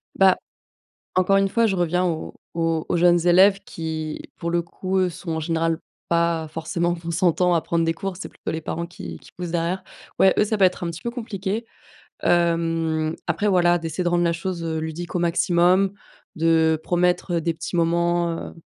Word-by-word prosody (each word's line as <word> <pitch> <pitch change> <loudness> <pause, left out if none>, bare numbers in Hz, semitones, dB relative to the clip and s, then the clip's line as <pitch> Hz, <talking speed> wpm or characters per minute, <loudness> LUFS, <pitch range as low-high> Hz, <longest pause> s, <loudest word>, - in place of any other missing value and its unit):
Bah, 190 -1 +5 0.8
encore 185 +2 +4
une 195 0 +2
fois 230 +3 +2
je 195 -3 0
reviens 175 +1 +1
aux 165 -3 -2 0.2
aux 165 -1 0
aux - - 0
jeunes 175 0 +4
élèves 190 +3 +6
qui, 160 -1 -5 0.2
pour 170 - -3
le 175 0 +2
coup, 185 +3 -3
eux, 185 -1 +3
sont 175 0 -7
en - - -2
général 165 0 0 0.3
pas 170 -1 +1
forcément 170 +2 -1
consentants 175 +1 +1
à 165 - +1
prendre 170 0 0
des 165 - +1
cours. 195 0 -4
C'est - - -6
plutôt - - -7
les 160 - -3
parents 165 +2 -4
qui 175 - -9
qui - - -17
poussent 175 -1 -6
derrière. 175 +2 -1 0.4
Ouais, 190 - +5
eux, - - +5
ça 215 0 -1
peut 195 - +5
être 180 -1 -2
un 170 - -2
petit 170 - -8
peu 235 - -3
compliqué. 220 -3 -4 0.6
Hem, 165 -2 +1
après 175 +5 0
voilà, 175 -2 +4
d'essayer 165 +2 -3
de - - +2
rendre 175 0 +2
la 170 0 +2
chose, 170 +1 -4
heu, 160 -1 -2
ludique 160 +2 -5
au - - +1
maximum, 175 +3 +3 0.4
de 160 -1 +3
promettre, 180 0 +1
heu, - - +1
des 165 +1 -1
petits 165 - -7
moments, 170 0 +2 0.2
heu, - - -16
170 Hz, 200 wpm, -23 LUFS, 165-185 Hz, 0.8 s, élèves